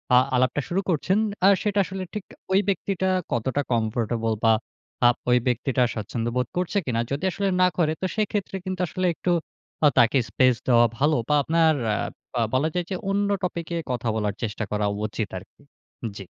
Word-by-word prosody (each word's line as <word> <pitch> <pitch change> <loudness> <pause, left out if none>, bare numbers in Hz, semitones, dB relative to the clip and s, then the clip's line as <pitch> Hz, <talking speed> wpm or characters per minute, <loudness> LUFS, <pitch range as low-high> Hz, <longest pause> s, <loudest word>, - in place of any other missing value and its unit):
আ - - +8 0.2
আলাপটা 130 +3 +2
শুরু 190 +3 0
করছেন 180 +5 +1 0.3
আ - - +8 0.2
সেটা 205 -1 +1
আসলে 190 0 -5
ঠিক 210 -3 -5 0.3
ওই 195 - +6
ব্যক্তিটা 190 0 0 0.2
কতটা 130 +4 0
কমফোর্টেবল 115 0 0
বা 115 -1 +6 0.5
আব 120 - +4
ওই 125 - +6
ব্যক্তিটা 125 +1 +1
স্বাচ্ছন্দ্য 115 +2 -3
বোধ 125 -1 +1
করছে 180 +3 0
কিনা? 115 -3 -1
যদি 140 +6 -2
আসলে 200 +2 -1
না 180 - +6
করে 155 -3 +2
তো 190 - 0
সেই 215 -2 +1
ক্ষেত্রে 200 -2 -2
কিন্তু 185 -1 -3
আসলে 185 +2 -1
একটু 180 - -1 0.5
আ - - +9
তাকে 120 +3 +5
স্পেস 130 -2 +3
দেওয়া 120 -1 +6
ভালো। 150 +4 +3
বা 150 - +4
আপনার 160 +1 +3 0.2
আ - - +1 0.4
বা 120 - 0
বলা 140 +5 +2
যায় 180 -1 -1
যে - - 0
অন্য 200 +1 +1
টপিকে 170 -1 -3 0.2
কথা 120 -1 -2
বলার 105 -2 -1
চেষ্টা 110 0 -2
করা 105 0 0 0.2
উচিত 110 -1 -3
আরকি। 90 - -14 0.6
জি। 95 - -8
140 Hz, 185 wpm, -25 LUFS, 115-185 Hz, 0.6 s, আ